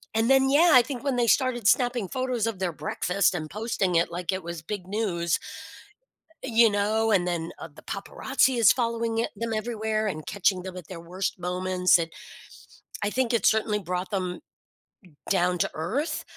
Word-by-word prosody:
and 225 +3 +2
then, 270 0 +5
yeah, 320 +4 +5
I 250 - +9
think 245 0 -6
when 270 -3 0
they 235 -1 +2
started 240 -4 +2
snapping 245 -4 +2
photos 255 -2 -2
of 225 -4 -3
their 185 -2 -1
breakfast 180 +5 0
and 155 -2 -4
posting 210 -4 -1
it 165 - +3
like 175 +2 -3
it 190 0 -3
was 170 -1 -6
big 185 0 -6
news. 185 -5 -1 1.1
You 230 -2 +4
know? 215 +2 +1
And 180 -4 +3
then, 170 -1 -3
uh, - - -8
the - - -15
paparazzi 260 +5 0
is 230 - +7
following 230 -2 -1
it 230 - 0
them 230 0 -3
everywhere 220 -1 -2
and 155 -6 -4
catching 190 -2 0
them 185 -1 -8
at 175 -4 -9
their 180 -3 -8
worst 185 +3 -4
moments 180 0 +2
and 165 -1 -3 1.0
I 205 - +1
think 250 +1 0
it 230 -5 +1
certainly 215 -1 +2
brought 180 +1 -4
them 185 -3 -2 0.9
down 180 -2 +2
to - - 0
earth. 225 - -2
205 Hz, 185 wpm, -26 LUFS, 180-230 Hz, 1.1 s, I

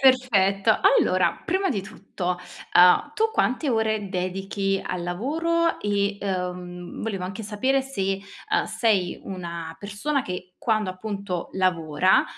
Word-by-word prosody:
perfetto. 225 -8 +4 0.2
Allora, - - +2
prima 385 0 +1
di 205 -6 0
tutto, 190 -3 -4 0.4
uhm, 180 +11 +6
tu 445 0 +2
quante 270 - +1
ore 220 -3 0
dedichi 195 +1 -1
al 175 -1 -3
lavoro, 325 - 0
e, 200 0 0
uhm, 180 -2 -4
volevo 205 -4 -3
anche 190 +4 -5
sapere 260 +7 +1
se, 195 -8 -2 0.3
uhm, - - +3
sei 200 -6 +1
una 170 -3 -6
persona 210 - -2
che 180 -2 -6
quando, 215 -5 +1
appunto, 195 -2 -4
lavora, 180 -1 +3
195 Hz, 125 wpm, -25 LUFS, 180-225 Hz, 0.4 s, uhm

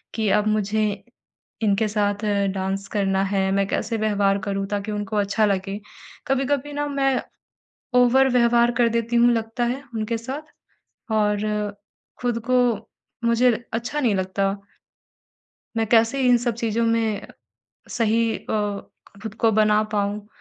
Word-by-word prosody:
कि 220 -2 0
अब 210 - 0
मुझे 215 0 +1 0.8
इनके 210 +1 +2
साथ 205 0 -1 0.3
डांस 195 +1 -3
करना 195 -1 +1
है। 195 -1 0
मैं 195 0 +2
कैसे 225 - -2
व्यवहार 205 -2 +1
करूँ 195 0 -1
ताकि 205 +1 -3
उनको 210 +1 -3
अच्छा 205 +2 +2
लगे, 195 0 -1 0.5
कभी-कभी 275 +2 0
ना 290 0 -2
मैं 270 -2 +1 0.8
ओवर 260 +2 +5
व्यवहार 235 0 +4
कर 240 -1 +4
देती 235 +1 -1
हूँ 240 +1 +5
लगता 225 +2 -2
है 250 +3 -2
उनके 225 +1 -2
साथ 265 +6 -6 0.7
और 210 -1 +2 0.8
खुद 240 -2 0
को 255 - +4 0.7
मुझे 235 +2 +4 0.2
अच्छा 240 +6 -2
नहीं 230 -6 +2
लगता। 190 +1 0 1.3
मैं 225 - +2
कैसे 230 +4 +3
इन 245 -1 +6
सब 240 0 -1
चीज़ों 230 0 -1
में 225 -2 0 0.6
सही 230 -1 +1
अ, 205 -2 -3 0.3
खुद 220 -1 -6
को 225 0 +2
बना 215 0 +4
पाऊँ 205 0 -1
220 Hz, 140 wpm, -23 LUFS, 205-235 Hz, 1.3 s, इन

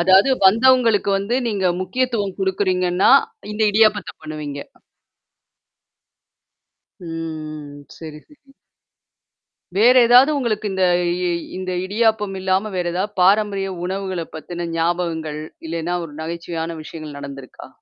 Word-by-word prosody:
அதாவது 190 +6 +5 0.2
வந்தவங்களுக்கு 230 0 +4
வந்து 200 +5 -2
நீங்க 200 -4 0
முக்கியத்துவம் 205 0 -2
குடுக்குறீங்கன்னா, 185 -1 +1 0.4
இந்த 215 +1 -2
இடியாபத்த 215 -1 +3
பண்ணுவீங்க. 150 -2 -6 2.4
ம். 155 -3 -7
ம். - - -17
சரி, 155 -2 -9
சரி. 280 -2 -22 1.2
வேற 235 +5 +6
ஏதாவது 250 +5 +7
உங்களுக்கு 225 -6 -1
இந்த 190 -1 +1 0.3
இ 180 +1 -3 0.3
இந்த 185 0 -4
இடியாப்பம் 210 -1 0
இல்லாம 190 +3 0
வேற 180 -1 -1
ஏதாவது 190 +4 -2
பாரம்பரிய 200 +1 +3 0.2
உணவுகள 190 -2 -3
பத்தின 175 +2 -6
ஞாபகங்கள், 165 -2 -2 0.3
இல்லன்னா 165 +2 -2
ஒரு 150 -3 -11
நகைச்சுவையான 165 0 -5
விஷயங்கள் 155 -3 -9
நடந்திருக்கா? 135 -2 -10
185 Hz, 110 wpm, -20 LUFS, 165-210 Hz, 2.4 s, ஏதாவது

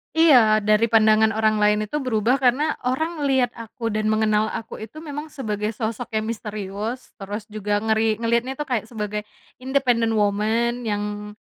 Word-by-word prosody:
Iya, 240 -10 +5
dari 215 +2 +3
pandangan 220 -1 +4
orang 215 -1 +2
lain 210 0 +3
itu 295 +8 -3
berubah 250 0 +1
karena 275 +5 +2
orang 315 +6 -1
ngelihat 265 -3 +2
aku, 230 0 -5
dan 215 0 -1
mengenal 215 0 +2
aku 225 - -6
itu 310 +9 -9
memang 295 0 -6
sebagai 215 -7 -3
sosok 225 +1 -4
yang 215 - 0
misterius, 210 +2 -5
terus 205 +2 -5
juga 205 -1 -1
ngeri 220 0 +2
ngelihatnya 235 +3 0
itu 295 - -3
kayak 235 -4 -1
sebagai 210 -2 -4 0.4
independent 250 -4 +1
woman, 220 +4 0
yang 210 0 -4
220 Hz, 155 wpm, -23 LUFS, 210-245 Hz, 0.4 s, Iya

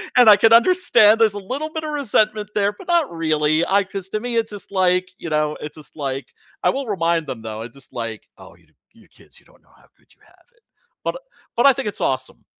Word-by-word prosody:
and 245 -3 +7
I 205 - +8
can 225 +1 +5
understand 230 - +5
there's 220 -3 +4
a 205 - -5
little 265 +10 -5
bit 320 - -4
of 310 - -4
resentment 215 -6 0
there, 205 -1 +2
but 205 - -15
not 340 -5 +2
really. 155 -1 +1
I 200 +1 +2
'cause 195 0 -6
to 215 - -3
me, 240 0 -2
it's 225 -1 -1
just 205 -1 -10
like, 185 -1 +1
you 170 - -7
know, 150 -1 0
it's 150 0 -8
just 155 0 -13
like 135 -2 -5 0.3
I - - +4
will 275 -1 -2
remind 165 -5 0
them 125 -4 -6
though. 110 0 -6
It's 120 +2 -11
just 135 -2 -11
like, 115 -2 -6
"Oh, - - -15
you - - -27 0.3
you - - -22
kids, - - -20
you - - -30
don't - - -25
know - - -29
how - - -25
good - - -29
you - - -43
have - - -26
it." 480 - -33 0.4
But - - -2 0.4
but 240 - +3
I 275 - +8
think 225 - -4
it's 205 - -9
awesome. 130 -1 -3
200 Hz, 250 wpm, -20 LUFS, 150-230 Hz, 0.4 s, I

